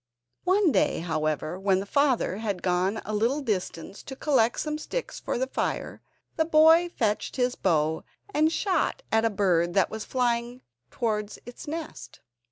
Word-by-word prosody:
One 375 -2 +4
day, - - +1
however, 155 +1 -2
when 195 -1 +2
the 195 - -4
father 260 -5 +1
had 205 -4 -3
gone 185 +2 +1
to - - -5
a 215 - -4
little 230 +7 +1
distance 200 - -4
to 265 - -8
collect 255 -5 +2
some 305 0 -2
sticks - - -5
for - - -3
the 260 - 0
fire, 260 - -3 0.4
the 320 - +4
boy 320 +2 +5
fetched 215 -9 -1
his 250 -1 +1
bow, 160 -4 0 0.3
and 310 +1 +3
shot 395 +7 0
at 225 0 +3
a - - +3
bird 175 -4 +1
that 195 - +3
was 220 - -5
just - - -22
flying 245 0 0 0.3
towards 215 -4 -2
its 245 +5 -10
nest. 320 +1 -7
230 Hz, 175 wpm, -26 LUFS, 195-295 Hz, 0.4 s, boy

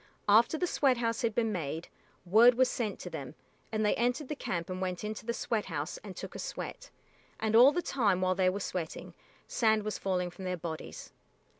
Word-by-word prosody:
After 225 +9 +5
the 360 - 0
sweat 275 -7 +2
house 230 -1 -1
had 230 -2 0
been 225 -2 +1
made, 160 -3 -3 0.4
word 225 +7 +7
was 255 +1 +3
sent 225 -6 -2
to - - -6
them, - - -6 0.4
and 215 -1 0
they 210 - +3
entered 245 +4 0
the 300 - -2
camp 170 - -3
and 185 0 -5
went 185 0 -3
into 215 +1 -5
the - - +1
sweat 230 -2 -1
house 155 -1 -4
and 195 -3 -10
took - - -7
a - - -7
sweat, - - -6 0.5
and 220 0 0
all 250 +5 +9
the 350 +3 -1
time 210 -9 +1
while 185 0 +2
they 185 0 +3
were 195 +2 -2
sweating, 180 -4 -5 0.3
sand 220 -2 +2
was 215 0 -3
falling 180 -2 -1
from 175 +2 -10
their 180 0 -2
bodies. 160 -1 -7
215 Hz, 210 wpm, -31 LUFS, 185-235 Hz, 0.5 s, all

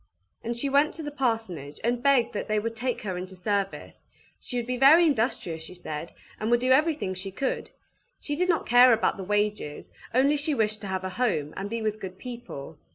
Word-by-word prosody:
And 235 +1 -2
she 280 - 0
went 285 +2 +3
to 320 - -6
the 295 - -5
parsonage, 225 - -2
and 240 +1 0
begged 270 -3 +3
that - - -3
they 215 -1 +1
would 230 +2 -2
take 245 +2 -2
her 190 -4 -3
into 185 +1 -7
service; 195 +1 -3 0.3
she 250 - -5
would 240 - -1
be 250 +1 -2
very 300 +7 +7
industrious, 220 - 0
she 160 +3 -9
said, 165 -2 -6 0.3
and 215 - -1
would 240 0 +4
do 255 +1 +1
everything 295 - +2
she 185 +1 -5
could; 260 +8 -3 0.5
she 290 - -3
did 360 +4 0
not 335 - +2
care 245 +1 +7
about 225 - +1
the 195 - -5
wages, 205 -5 -2 0.2
only 275 +4 +3
she 290 +1 0
wished 215 -2 0
to 205 - -6
have 190 -1 -2
a 185 - -2
home, 185 - -1
and 195 +1 -4
be 230 0 -3
with 215 0 -1
good 185 -2 -7
people. 210 - -8
225 Hz, 220 wpm, -27 LUFS, 190-260 Hz, 0.5 s, very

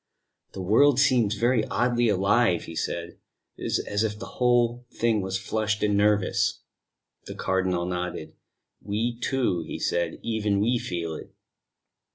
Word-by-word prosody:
"The 95 - -5
world 125 +8 +4
seems 125 -7 +3
very 120 0 +2
oddly 120 -1 +1
alive," 100 -1 +2
he 85 - -9
said; 85 +1 -4 0.4
"it - - -11
is - - +1
as 100 +1 -1
if 105 -1 -2
the - - -7 0.2
whole 120 0 +2
thing 115 -3 +1
was 95 0 -2
flushed 110 +1 -2
and 105 -1 +2
nervous." 105 -1 +1 0.6
The - - -7
Cardinal 95 -2 0
nodded. 90 0 -4 0.5
"We, 110 +4 -2
too," 120 -9 0
he - - -6
said, 85 -1 -1
"even 105 -3 0
we 120 +4 +2
feel 85 -5 -4
it." - - -10
105 Hz, 150 wpm, -26 LUFS, 95-120 Hz, 0.6 s, world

